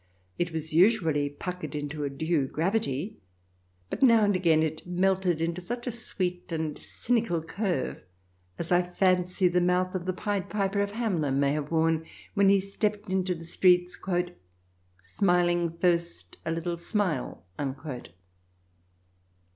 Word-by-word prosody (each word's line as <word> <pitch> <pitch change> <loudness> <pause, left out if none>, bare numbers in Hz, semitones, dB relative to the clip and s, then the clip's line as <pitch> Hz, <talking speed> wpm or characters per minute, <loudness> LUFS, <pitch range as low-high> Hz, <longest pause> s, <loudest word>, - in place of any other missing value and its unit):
It 175 -1 0
was 160 -1 -4
usually 165 -6 +4
puckered 155 0 -6
into 145 0 -4
a 140 - -1
due 150 0 0
gravity, 180 +1 -1 0.7
but - - -4
now 230 -4 +6
and 205 -1 +2
again 165 -4 +3
it 155 +2 -3
melted 180 -1 +1
into 170 +2 -1
such 240 +6 -5
a 250 - -1
sweet 180 -6 -3
and 160 -2 -2
cynical 225 -9 -1
curve 180 - -2 0.6
as 170 - -3
I 175 0 +5
fancy 180 0 +2
the 180 0 +2
mouth 180 +1 +1
of 185 -1 -4
the 185 - +1
Pied 200 0 -2
Piper 200 -1 0
of 200 0 -2
Hamelin 170 - 0
may 140 0 +3
have 150 0 -2
worn 160 0 +2 0.3
when 200 -1 +4
he 200 0 +5
stepped 205 +1 -2
into 185 -1 +1
the 165 0 -9
streets, 180 +1 +3 1.0
"smiling 175 - +1
first 170 - 0
a - - +1
little 170 +1 -2
smile." 170 - -2
175 Hz, 140 wpm, -28 LUFS, 160-195 Hz, 1.0 s, now